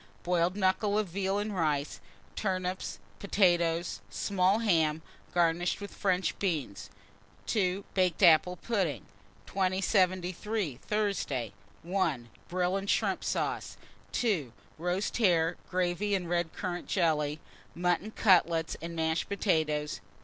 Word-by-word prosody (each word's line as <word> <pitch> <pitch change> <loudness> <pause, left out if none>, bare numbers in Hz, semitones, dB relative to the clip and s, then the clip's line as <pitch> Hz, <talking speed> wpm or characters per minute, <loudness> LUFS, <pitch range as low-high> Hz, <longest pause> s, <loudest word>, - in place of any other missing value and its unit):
Boiled 175 0 +1
knuckle 200 +1 +1
of 215 -3 0
veal 195 +2 -1
and 205 0 -2
rice, 150 -4 0 0.4
turnips, 185 -2 -2 0.2
potatoes; 175 - +2
small 185 - +2
ham, 160 -8 +2 0.3
garnished 175 0 +1
with 200 0 -8
French 185 -2 0
beans. 130 - -2 0.6
2. 195 -2 0
Baked 185 -3 +1
apple 170 +2 +6
pudding. 180 - -1 0.4
2073. 185 - 0
Thursday. 180 - -2 0.3
1. 165 -9 -1 0.2
Brill 180 +1 0
and 195 0 -4
shrimp - - +1
sauce. - - -2 0.4
2. 185 - 0 0.3
Roast 180 +4 -1
hare, 175 -6 +3
gravy, 185 +3 0
and 180 -3 -2
red 175 -1 0
currant 175 -2 -4
jelly; 155 -4 +1 0.4
mutton 180 +3 0
cutlets 170 -6 +3
and 170 0 -6
mashed 160 0 0
potatoes. 155 -7 0
180 Hz, 115 wpm, -30 LUFS, 160-195 Hz, 0.6 s, apple